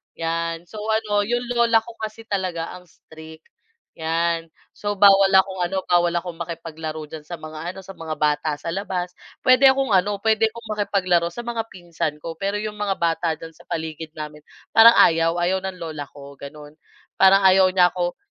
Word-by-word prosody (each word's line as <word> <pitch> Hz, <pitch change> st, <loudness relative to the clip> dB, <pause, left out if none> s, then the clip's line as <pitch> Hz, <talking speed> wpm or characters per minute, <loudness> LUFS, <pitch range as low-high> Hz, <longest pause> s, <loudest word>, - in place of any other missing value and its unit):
yan. 165 Hz, 0 st, -3 dB
So, 210 Hz, +4 st, -11 dB
ano 220 Hz, -2 st, +1 dB
yung 240 Hz, +1 st, 0 dB
lola 230 Hz, -2 st, +3 dB
ko 235 Hz, -, -10 dB
kasi 220 Hz, +1 st, -6 dB
talaga 185 Hz, -5 st, -3 dB
ang 180 Hz, -, -21 dB
strict, 160 Hz, 0 st, -15 dB, 0.6 s
yan. 165 Hz, +1 st, -1 dB, 0.3 s
So 205 Hz, 0 st, -3 dB
bawal 195 Hz, 0 st, +6 dB
akong 190 Hz, 0 st, +3 dB
ano 190 Hz, 0 st, -3 dB
bawal 175 Hz, -1 st, +2 dB
akong 170 Hz, -1 st, -4 dB
makipaglaro 160 Hz, -2 st, -6 dB
diyan 155 Hz, -1 st, -9 dB
sa 175 Hz, -, -5 dB
mga 155 Hz, +2 st, -7 dB
ano, 195 Hz, -, -10 dB
sa 195 Hz, -, -9 dB
mga 160 Hz, -2 st, -6 dB
bata 150 Hz, 0 st, 0 dB
sa 165 Hz, +3 st, -6 dB
labas. 185 Hz, -2 st, -3 dB, 0.3 s
Pwede 255 Hz, +1 st, +6 dB
akong 265 Hz, -3 st, +2 dB
ano, 200 Hz, +2 st, +2 dB
pwede 220 Hz, 0 st, +3 dB
akong 230 Hz, +1 st, -10 dB
makipaglaro 180 Hz, -4 st, +1 dB
sa 240 Hz, +8 st, -8 dB
mga 230 Hz, -1 st, -3 dB
pinsan 170 Hz, -4 st, -4 dB
ko. 165 Hz, -, -5 dB
Pero 200 Hz, +1 st, -1 dB
yung 210 Hz, 0 st, -5 dB
mga 200 Hz, -2 st, 0 dB
bata 165 Hz, -1 st, 0 dB
diyan 165 Hz, 0 st, -10 dB
sa -, -, -20 dB
paligid 160 Hz, 0 st, -5 dB
namin, 150 Hz, 0 st, -7 dB, 0.3 s
parang 230 Hz, +1 st, +8 dB
ayaw. 165 Hz, +1 st, +4 dB
Ayaw 180 Hz, +2 st, +1 dB
ng 190 Hz, -1 st, -5 dB
lola 155 Hz, -4 st, -6 dB
ko 140 Hz, -1 st, -12 dB
ganun. 150 Hz, +1 st, -11 dB, 0.5 s
Parang 195 Hz, +1 st, +6 dB
ayaw 190 Hz, 0 st, +6 dB
niya 180 Hz, -2 st, +4 dB
ko 175 Hz, -1 st, -2 dB
175 Hz, 185 wpm, -22 LUFS, 165-200 Hz, 0.6 s, parang